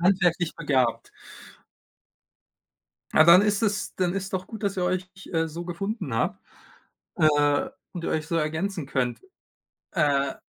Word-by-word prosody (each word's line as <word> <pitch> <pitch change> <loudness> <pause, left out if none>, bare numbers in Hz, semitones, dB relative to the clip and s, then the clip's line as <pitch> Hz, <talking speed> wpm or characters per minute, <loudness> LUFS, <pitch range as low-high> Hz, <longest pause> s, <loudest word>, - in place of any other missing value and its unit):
Handwerklich 180 -2 +2
begabt. 130 -7 0 2.0
Ah, 155 - +6
dann 170 +3 +8
ist 210 0 +1
das 210 -2 -1
dann 180 -1 0
ist 195 0 -4
doch 185 0 -3
gut, 220 -1 -9
dass 195 -1 -1
ihr 180 - 0
euch 185 +1 -2
ch 195 - -13
äh, 165 -1 0
so 170 +2 -7
gefunden 190 - -4
habt, 115 -5 0 0.8
äh, 145 - +3 0.2
und 175 -2 -6
ihr - - -1
euch 155 0 -1
so 165 - -2
ergänzen 160 +2 -1
könnt. 130 -3 -1 0.7
Äh 140 -2 +1
170 Hz, 150 wpm, -26 LUFS, 150-190 Hz, 2.0 s, dann